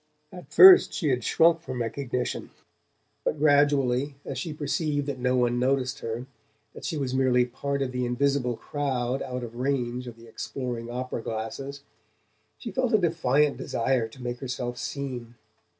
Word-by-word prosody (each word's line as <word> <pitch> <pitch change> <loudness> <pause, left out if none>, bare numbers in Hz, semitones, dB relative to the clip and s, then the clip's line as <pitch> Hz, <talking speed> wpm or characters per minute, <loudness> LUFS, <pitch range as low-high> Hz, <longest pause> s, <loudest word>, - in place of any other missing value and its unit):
At - - -11
first 375 -1 +9
she 160 -7 0
had 125 -2 0
shrunk 165 +4 +4
from 130 -5 -5
recognition; 125 +2 -3 0.7
but - - -1
gradually, 145 -2 +3
as 135 -2 -4
she 160 - -4
perceived 150 -1 -1
that 140 -2 -4
no 125 0 +1
one 120 -1 +2
noticed 130 0 0
her, 115 +2 -4 0.5
that - - -11
she 160 - -2
was 135 -3 -2
merely 130 -2 +3
part 140 +3 -3
of 130 - -3
the 125 0 -2
invisible 125 0 0
crowd 135 -3 -2
out 125 -1 -4
of 120 0 -8
range 125 -1 -1
of 120 -1 -9
the 115 - -15
exploring 120 0 -5
opera 125 -1 -4
glasses, 115 +6 -5 0.7
she - - -7
felt 255 -4 +1
a - - +7
defiant 150 -5 +2
desire 120 -1 0
to 125 +3 -13
make 120 0 -4
herself 125 -2 -4
seen. 125 -4 -5
130 Hz, 165 wpm, -26 LUFS, 120-140 Hz, 0.7 s, first